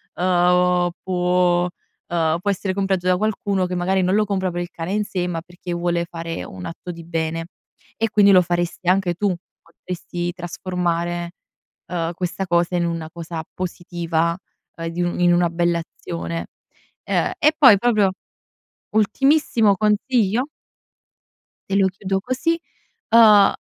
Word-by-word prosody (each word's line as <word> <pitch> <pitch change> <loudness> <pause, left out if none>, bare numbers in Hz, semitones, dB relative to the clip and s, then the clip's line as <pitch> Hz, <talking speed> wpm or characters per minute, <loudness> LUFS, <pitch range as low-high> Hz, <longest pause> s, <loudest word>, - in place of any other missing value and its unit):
uhm, 180 0 +3
può 180 -1 +2
uhm, 170 -2 -3
può 200 - -1
essere 190 0 -2
comprato 190 -2 -1
da 180 0 +4
qualcuno, 200 -2 0
che 180 - -3
magari 185 +2 +1
non 185 +1 +1
lo 215 - +4
compra 190 -2 -1
per 175 0 -3
il 175 - -5
cane 170 +4 -4
in 210 - +1
sé, 180 -3 -2
ma 170 -2 -3
perché 175 +1 -8
vuole 170 0 0
fare 165 - -6
un 95 0 -9
atto 175 +2 -7
di 170 -1 -10
bene, 165 0 -2 0.5
e 225 0 0
quindi 205 -2 +5
lo 185 - +7
faresti 175 0 -2
anche 185 -1 +2
tu. 195 0 0 0.3
Potresti 175 +1 -5
trasformare, 175 -1 -3 0.6
uhm, 170 -1 -2
questa 180 +2 -3
cosa 175 +1 +1
in 170 - +1
una 165 -2 -3
cosa 165 -1 -6
positiva, 170 -2 -2 0.4
uhm, 165 0 -4
di 170 +2 -3
un 175 0 -2
in 175 0 +4
una 175 -1 +3
bella 170 0 +1
azione 170 0 -6 0.6
Ehm, - - 0
e 305 0 +4
poi 260 -9 +8
proprio 210 -3 +2 0.8
ultimissimo 225 -1 +3
consiglio 215 +3 +1 1.2
te 195 - 0
lo 195 -1 +4
chiudo 190 0 -2
così, 295 - -1 0.5
uhm, 215 -3 +7
180 Hz, 150 wpm, -21 LUFS, 170-195 Hz, 1.2 s, poi